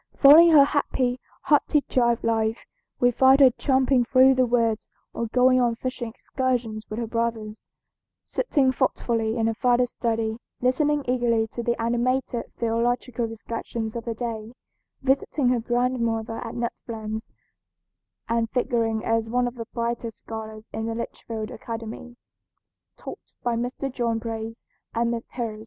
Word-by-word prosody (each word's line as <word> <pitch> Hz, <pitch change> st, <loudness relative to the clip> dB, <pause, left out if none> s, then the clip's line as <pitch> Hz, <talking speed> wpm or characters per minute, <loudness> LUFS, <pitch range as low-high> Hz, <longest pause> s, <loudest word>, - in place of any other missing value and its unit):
Following 310 Hz, +5 st, +9 dB
her 290 Hz, -2 st, +9 dB
happy, 260 Hz, -3 st, 0 dB, 0.2 s
hearty 295 Hz, 0 st, +3 dB
child 235 Hz, -4 st, +1 dB
life, 225 Hz, 0 st, +1 dB, 0.4 s
we 245 Hz, 0 st, +4 dB
find 265 Hz, +3 st, +5 dB
her 265 Hz, -2 st, +8 dB
tramping 260 Hz, 0 st, +2 dB
through 260 Hz, +2 st, +5 dB
the 255 Hz, -1 st, +2 dB
woods 230 Hz, -2 st, +1 dB, 0.2 s
or 230 Hz, -, -2 dB
going 255 Hz, +2 st, +4 dB
on 240 Hz, -1 st, +2 dB
fishing 250 Hz, -1 st, -4 dB
excursions 235 Hz, -3 st, -3 dB
with 215 Hz, -, -5 dB
her 235 Hz, -, -2 dB
brothers, 225 Hz, -2 st, -3 dB, 0.6 s
sitting 280 Hz, -, +1 dB
thoughtfully 235 Hz, -3 st, 0 dB
in 225 Hz, -, +1 dB
her 225 Hz, -, +1 dB
father's 245 Hz, +1 st, +2 dB
study, 225 Hz, -1 st, -2 dB, 0.2 s
listening 290 Hz, +3 st, +1 dB
eagerly 240 Hz, -3 st, +2 dB
to 235 Hz, -, -5 dB
the 235 Hz, 0 st, -1 dB
animated 240 Hz, +1 st, -1 dB
theological 235 Hz, +1 st, 0 dB
discussions 225 Hz, 0 st, -5 dB
of 235 Hz, -, -5 dB
the 230 Hz, -1 st, -3 dB
day, 225 Hz, -1 st, -5 dB, 0.5 s
visiting 270 Hz, 0 st, +1 dB
her 250 Hz, -1 st, +2 dB
grandmother 235 Hz, -2 st, -1 dB
at 230 Hz, -, -7 dB
Nut 235 Hz, 0 st, -2 dB
Plains, 220 Hz, -1 st, -5 dB, 1.0 s
and 230 Hz, 0 st, 0 dB
figuring 230 Hz, -3 st, 0 dB
as 225 Hz, 0 st, 0 dB
one 245 Hz, +1 st, +1 dB
of 245 Hz, -, -4 dB
the 230 Hz, -2 st, -7 dB
brightest 235 Hz, -1 st, -3 dB
scholars 220 Hz, -1 st, -8 dB
in 220 Hz, 0 st, -3 dB
the 225 Hz, -, -3 dB
Litchfield 225 Hz, -1 st, -5 dB
Academy, 230 Hz, +1 st, -7 dB, 0.8 s
taught -, -, -10 dB
by 240 Hz, -1 st, 0 dB
Mr. 245 Hz, +3 st, -3 dB
John 235 Hz, -3 st, 0 dB
Brace 225 Hz, 0 st, -6 dB, 0.3 s
and 235 Hz, +1 st, +1 dB
Miss 235 Hz, -1 st, -4 dB
Pierce. 225 Hz, -4 st, -5 dB
235 Hz, 145 wpm, -25 LUFS, 225-250 Hz, 1.0 s, Following